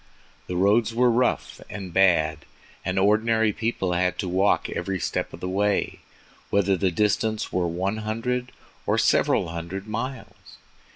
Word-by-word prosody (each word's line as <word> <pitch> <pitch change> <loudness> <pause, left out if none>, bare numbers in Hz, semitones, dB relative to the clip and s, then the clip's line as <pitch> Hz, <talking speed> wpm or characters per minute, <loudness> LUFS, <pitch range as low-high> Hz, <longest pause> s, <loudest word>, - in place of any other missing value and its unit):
The 90 - -4
roads 105 +5 +3
were 125 0 +4
rough 125 +2 0
and 95 -4 -7
bad, 80 -6 +3 0.4
and 90 - -2
ordinary 110 +2 +3
people 110 -5 -1
had 90 +1 +1
to 95 - -3
walk 95 +3 +2
every 95 -1 -3
step - - -2
of - - -11
the 90 - -3
way, 100 +2 0 0.5
whether 100 -1 +2
the 95 +1 +1
distance 105 +3 0
were 90 -1 +1
one 95 +5 -2
hundred 120 +4 -2 0.4
or - - +2
several - - +2
hundred 85 +4 -5
miles. 115 +5 -6
100 Hz, 150 wpm, -25 LUFS, 90-110 Hz, 0.5 s, were